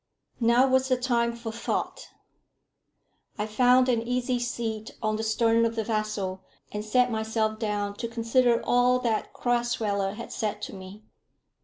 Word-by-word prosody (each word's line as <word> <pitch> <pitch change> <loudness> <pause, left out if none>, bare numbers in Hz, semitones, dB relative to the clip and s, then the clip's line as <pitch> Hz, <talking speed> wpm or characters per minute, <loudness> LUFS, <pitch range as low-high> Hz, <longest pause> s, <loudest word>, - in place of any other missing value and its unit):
Now 240 +2 +4
was 260 0 +2
the 255 -1 +2
time 235 -2 0
for 235 -1 -6
thought. 230 +1 -3 1.3
I 210 - -1
found 250 +4 +4
an 240 -3 +2
easy 250 +1 -1
seat 230 -2 -4
on 215 -1 0
the 220 - -2
stern 225 +1 +2
of 230 0 0
the 225 - -1
vessel, 215 -4 -2 0.3
and 210 0 -4
sat 250 +3 +2
myself 220 0 -1
down 205 -2 -2
to 235 - -3
consider 235 +1 +2
all 245 +1 +4
that 230 -3 -1
Crasweller 225 -5 0
had 235 - -8
said 210 -1 -2
to - - -5
me. 190 +2 -10
230 Hz, 155 wpm, -27 LUFS, 215-245 Hz, 1.3 s, Now